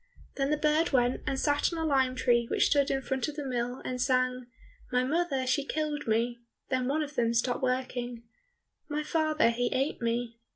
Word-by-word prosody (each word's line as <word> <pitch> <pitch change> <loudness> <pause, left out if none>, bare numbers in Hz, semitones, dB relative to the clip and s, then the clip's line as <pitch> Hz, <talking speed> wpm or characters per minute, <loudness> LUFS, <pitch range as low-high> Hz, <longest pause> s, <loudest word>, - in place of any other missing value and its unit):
Then 275 0 0
the 300 - +2
bird 305 +2 +2
went 245 -1 +2
and 270 - 0
sat 290 +3 +2
on 335 - -4
a 325 - -1
lime 265 -4 +2
tree 240 -2 +2
which - - +3
stood 285 -1 +3
in 270 0 -1
front 265 -1 -1
of 300 - -6
the 295 -2 -4
mill, 245 0 -3
and 250 -1 -3
sang, 255 -1 +1 0.4
"My 250 0 +2
mother 285 -2 0
she 275 +3 +1
killed 300 -1 -3
me," 235 +2 +1 0.3
Then 255 -1 0
one 305 +3 +1
of 295 0 -7
them 235 -3 +1
stopped 245 +1 +1
working, 250 -2 -2 0.7
"My 300 +1 -1
father 310 -4 +2
he 245 +1 0
ate 270 +1 -1
me." 235 0 -2
260 Hz, 200 wpm, -29 LUFS, 245-295 Hz, 0.7 s, which